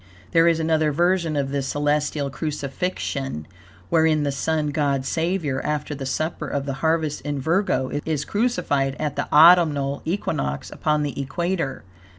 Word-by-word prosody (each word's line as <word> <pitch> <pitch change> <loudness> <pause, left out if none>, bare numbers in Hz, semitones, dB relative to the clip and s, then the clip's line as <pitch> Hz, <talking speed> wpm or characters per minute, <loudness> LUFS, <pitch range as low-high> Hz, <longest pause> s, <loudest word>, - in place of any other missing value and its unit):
There 165 0 +5
is 165 -1 +3
another 160 -1 +2
version 170 0 +1
of 140 -2 -1
this 140 -1 -1
celestial 145 0 0
crucifixion, 140 - -3 0.4
wherein 160 -2 +3
the 145 - 0
Sun 155 +2 -1
God 140 -2 0
Savior, 160 -3 -1
after 150 0 -2
the 135 -2 -5
supper 155 +5 -2
of 140 -1 -2
the 140 - -2
harvest 160 -2 0
in 145 0 -3
Virgo, 160 -3 0
is 155 -2 -2
crucified 145 - 0
at 150 -3 -2
the 145 - -3
autumnal 150 -4 +5
equinox 70 - -2
upon 150 -1 0
the 140 -1 -3
equator. 170 +1 -2
150 Hz, 150 wpm, -23 LUFS, 140-165 Hz, 0.4 s, There